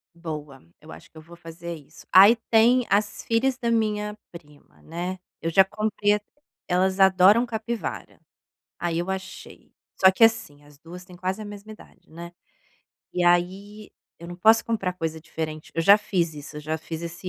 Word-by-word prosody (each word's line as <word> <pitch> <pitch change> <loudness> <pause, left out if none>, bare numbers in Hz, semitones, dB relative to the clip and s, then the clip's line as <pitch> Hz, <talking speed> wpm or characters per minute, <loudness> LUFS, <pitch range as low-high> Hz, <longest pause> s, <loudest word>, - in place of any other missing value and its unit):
Boa. 150 -5 -8 0.2
Eu 155 +1 -14
acho - - -13
que - - -18
eu 155 - -10
vou 170 +2 -15
fazer 170 0 -9
isso. 155 +1 -16
Aí 200 +6 +8
tem 235 +2 +4
as 205 +1 0
filhas 245 +3 0
da 240 -3 -2
minha 210 -2 -1 0.2
prima, 150 -4 -16
né. 175 +3 -5 0.2
Eu 165 - -2
já 190 +4 +5
comprei 210 +1 -1
a 210 - -5 0.5
elas 185 +1 0
adoram 190 +4 +5
capivara. 230 0 -6 0.6
Aí 170 -1 -2
eu 175 +3 -3
achei. 190 0 -8 0.3
Só 190 0 +6
que, 190 - -4
assim, 225 -11 0
as 145 -1 -20
2 175 +3 -12
têm 180 -1 -15
quase 185 +3 -4
a - - -8
mesma 205 +1 -10
idade, 215 - -18
né. 170 +2 -10 0.8
E 180 - -1
aí 190 +5 0 0.3
eu 170 - -11
não 175 - -8
posso 220 +5 +4
comprar 210 -5 -2
coisa 160 -2 -4
diferente. 155 -1 -7
Eu 165 - 0
já 200 +5 +7
fiz 170 -6 -2
isso. 150 0 -10
Eu - - -6
já 155 +1 -4
fiz 160 +1 -7
esse 170 +2 -7
185 Hz, 185 wpm, -24 LUFS, 165-210 Hz, 0.8 s, Aí